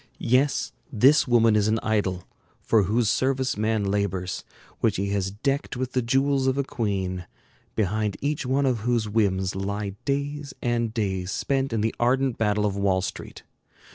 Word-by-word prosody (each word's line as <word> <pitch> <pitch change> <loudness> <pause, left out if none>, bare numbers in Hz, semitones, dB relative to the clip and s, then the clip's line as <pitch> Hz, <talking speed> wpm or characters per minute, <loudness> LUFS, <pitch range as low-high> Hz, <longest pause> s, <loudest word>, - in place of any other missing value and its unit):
Yes, 130 +4 +1 0.2
this 135 +6 +5
woman 115 -3 +4
is 105 -1 +3
an 110 +1 +2
idol, 100 -5 0 0.4
for 110 -4 +2
whose 110 +4 +1
service 130 +3 +1
man 110 0 0
labors, 95 -2 -1 0.4
which - - +2
he 100 +1 -1
has 100 -1 0
decked 135 +6 -2
with 130 0 -3
the 130 - +1
jewels 135 +2 +1
of 130 +1 +1
a 140 - +2
queen, 95 -7 -3 0.5
behind 105 0 0
each 145 +2 -1
one 135 +2 +1
of 125 -4 +1
whose 115 0 0
whims 95 -3 +1
lie 100 +1 -3
days 140 +1 -2
and 120 -2 0
days 95 -5 -2
spent 135 +5 -1
in 115 -2 0
the 110 +1 0
ardent 130 +1 +1
battle 105 -1 +1
of 100 -2 0
Wall 95 -2 +1
Street. - - -7
110 Hz, 170 wpm, -25 LUFS, 100-130 Hz, 0.5 s, this